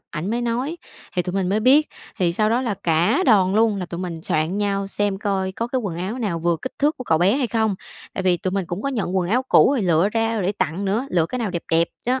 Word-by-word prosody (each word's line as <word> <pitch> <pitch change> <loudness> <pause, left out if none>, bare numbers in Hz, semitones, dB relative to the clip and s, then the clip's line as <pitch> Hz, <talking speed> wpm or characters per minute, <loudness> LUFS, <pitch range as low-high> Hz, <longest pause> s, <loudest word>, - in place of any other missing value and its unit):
ảnh 170 +6 -4
mới 240 +1 0
nói, 245 +7 -2 0.4
thì 180 - +2
tụi 180 - -4
mình 190 -2 0
mới 210 +3 +1
biết, 275 +6 +5 0.3
thì 175 -2 +1
sau 215 +4 +1
đó 240 +3 +2
là 235 -5 -1
cả 170 - +1
đoàn 195 -4 +4
luôn 220 -1 +3
là 180 -2 -4
tụi 170 +1 -6
mình 170 -3 -5
soạn 160 +5 -1
nhau 200 -1 0
xem 205 -1 -1
coi 190 -2 -1
có 230 - -3
cái 260 +1 -1
quần 195 -7 -4
áo 190 +8 -4
nào 200 -9 -2
vừa 170 0 +1
kích 260 - -4
thước 295 +2 +2
của 255 - -7
cậu 160 - +2
bé 190 +8 +3
hay 270 -3 0
không. 220 -3 0 0.4
Tại - - -2
vì 180 -1 +3
tụi 185 - -3
mình 190 -1 -2
cũng 175 +5 -5
có - - -1
nhận 210 -8 -2
quần 180 -1 0
áo 250 +5 +2
cũ - - +6
rồi 275 -6 0
lựa 175 +1 +3
ra 225 0 0
để 190 - 0
tặng 190 -1 -2
nữa, 215 +7 0
lựa 165 -3 +2
cái 255 - -4
nào 225 -5 -2
đẹp 170 -2 -4
đẹp 165 +1 +3 0.2
đó, 255 +1 +1
200 Hz, 280 wpm, -22 LUFS, 180-230 Hz, 0.4 s, cũ